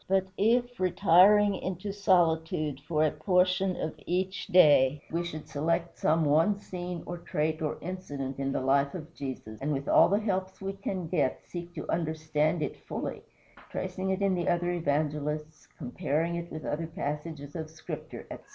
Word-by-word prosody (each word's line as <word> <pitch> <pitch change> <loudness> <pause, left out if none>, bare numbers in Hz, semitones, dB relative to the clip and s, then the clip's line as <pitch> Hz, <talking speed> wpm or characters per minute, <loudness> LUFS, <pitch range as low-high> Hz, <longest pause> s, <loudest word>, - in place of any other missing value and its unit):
But 190 0 +2
if, 240 +4 +2
retiring 195 +3 +5
into 185 +1 -4
solitude 160 -7 +2
for 155 -2 +2
a 155 - +2
portion 185 0 +2
of 160 - -3
each 185 +2 -1
day, 145 -5 +5
we 170 +1 0
should 155 -3 -6
select 165 +3 -1
some 160 +1 +3
one 165 +8 +3
scene 180 -3 -6
or 175 0 -5
trait 155 -1 -1
or 155 - -1
incident 145 -7 -5
in 135 0 -1
the - - -1
life 140 +2 +2
of 165 -2 -8
Jesus, 130 -7 -7
and 145 +3 -1
with 140 -1 -2
all - - +6
the 200 +2 +3
helps 190 -3 -2
we 195 0 -3
can 190 -3 -4
get 155 -6 0
seek 175 0 -7
to - - -6
understand 155 -1 0
it - - -4
fully, - - -4 0.5
tracing 185 +1 -3
it 190 +1 0
in 195 -1 +3
the 175 -1 0
other 175 0 +1
evangelists, 150 -1 -2
comparing 155 +7 -1
it 170 0 -4
with 155 - -6
other 160 +2 -2
passages 150 -3 -5
of 160 -2 -4
Scripture, 160 - -8
etc. - - -8
165 Hz, 170 wpm, -29 LUFS, 150-185 Hz, 0.5 s, all